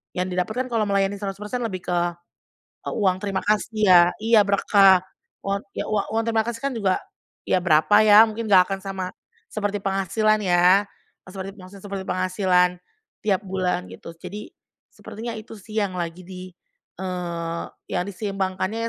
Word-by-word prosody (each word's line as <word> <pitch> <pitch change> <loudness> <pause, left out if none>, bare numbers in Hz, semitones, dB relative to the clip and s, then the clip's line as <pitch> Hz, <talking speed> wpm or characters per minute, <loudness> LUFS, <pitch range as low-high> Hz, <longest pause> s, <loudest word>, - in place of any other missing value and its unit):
yang 180 +1 -1
didapatkan 215 +8 -2
kalau 220 -2 +1
melayani 200 0 +1
100% 205 +4 -5
lebih 185 -5 -5
ke 175 -1 +2 0.9
uang 190 -4 +1
terima 195 -2 -1
kasih 215 0 +1
ya. 180 -2 +8 0.2
Iya 225 -1 +5
berkah, 195 -2 +5 0.4
uang 200 0 -1 0.2
ya - - -2
uang 215 -2 0
uang 225 - +1
terima 225 -1 +2
kasih 235 -1 -4
kan 275 - -1
juga 195 -4 +1 0.5
ya 185 - +2
berapa 160 +4 +4
ya? 210 +1 +9
Mungkin 220 +1 -5
gak 185 -2 +7
akan 195 - -2
sama 190 -1 -4 0.5
seperti 205 -1 -2
penghasilan 200 +3 +1
ya, 180 +2 +4 0.4
eee, - - -13
seperti 195 0 -6
maksudnya 190 +2 -13
seperti 195 -1 -5
penghasilan 185 -1 +2 0.5
tiap 200 -2 +1
bulan 180 -1 -1
gitu, 165 - -10
jadi, 190 +5 -8 0.4
sepertinya 230 +2 -7
itu 220 +1 -10
sih 215 +2 -12
yang 200 -3 -1
lagi 170 +1 -5
di 185 0 -9 0.5
eee, 170 -3 -4 0.3
yang - - 0
diseimbangkannya 195 +2 -3
195 Hz, 155 wpm, -23 LUFS, 185-215 Hz, 0.9 s, ya